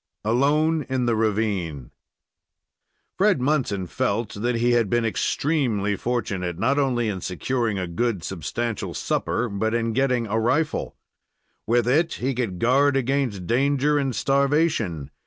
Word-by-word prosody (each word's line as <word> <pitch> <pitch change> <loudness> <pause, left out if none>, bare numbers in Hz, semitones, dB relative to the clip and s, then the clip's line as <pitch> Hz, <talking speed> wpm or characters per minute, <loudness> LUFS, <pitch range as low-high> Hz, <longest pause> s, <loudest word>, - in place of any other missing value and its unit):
ALONE 150 +7 +2
IN 130 -1 0
THE 120 -1 +2
RAVINE 100 - -1 1.3
Fred 200 -5 +4
Munson 125 -9 0
felt 120 +2 -2
that 120 +4 -1
he 120 +1 +2
had 120 -4 +2
been 120 +1 +1
extremely 115 -5 0
fortunate, 95 -8 -2
not 130 +9 +1
only 125 -4 +1
in 95 -4 -3
securing 110 +4 -1
a 95 - -2
good, 95 +2 -2
substantial 100 +6 -4
supper, 125 - -1
but 110 +2 -1
in 115 -1 0
getting 125 -1 +1
a 110 +1 -1
rifle. 150 +7 0 0.7
With 120 +1 +2
it 160 +6 +2
he 135 +2 -2
could 115 -7 -2
guard 135 +5 +3
against 130 -7 -1
danger 140 +6 +2
and 135 -4 -1
starvation. 140 - +1
120 Hz, 140 wpm, -24 LUFS, 105-135 Hz, 1.3 s, Fred